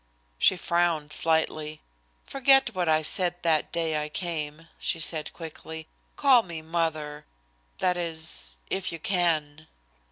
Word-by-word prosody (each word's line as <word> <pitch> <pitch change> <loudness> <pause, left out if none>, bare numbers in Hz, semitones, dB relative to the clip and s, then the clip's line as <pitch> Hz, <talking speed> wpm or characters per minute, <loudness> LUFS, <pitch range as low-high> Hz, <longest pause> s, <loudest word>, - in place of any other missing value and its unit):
She 185 - +5
frowned 170 -4 0
slightly. 155 -1 +1 0.5
"Forget 270 -2 +4
what 180 -3 0
I 155 0 +3
said 175 +2 +1
that 160 -3 +2
day 160 -2 0
I 150 - -5
came," 160 -1 -4
she 165 - -1
said 155 -1 +1
quickly. 160 -1 -8 0.3
"Call 270 -4 +6
me 170 -6 -8
Mother, 155 -3 -2 0.5
that 180 -1 +2
is, 160 - -4 0.2
if 190 -1 -1
you 165 - -5
can." 160 -4 0
160 Hz, 130 wpm, -27 LUFS, 155-175 Hz, 0.5 s, Call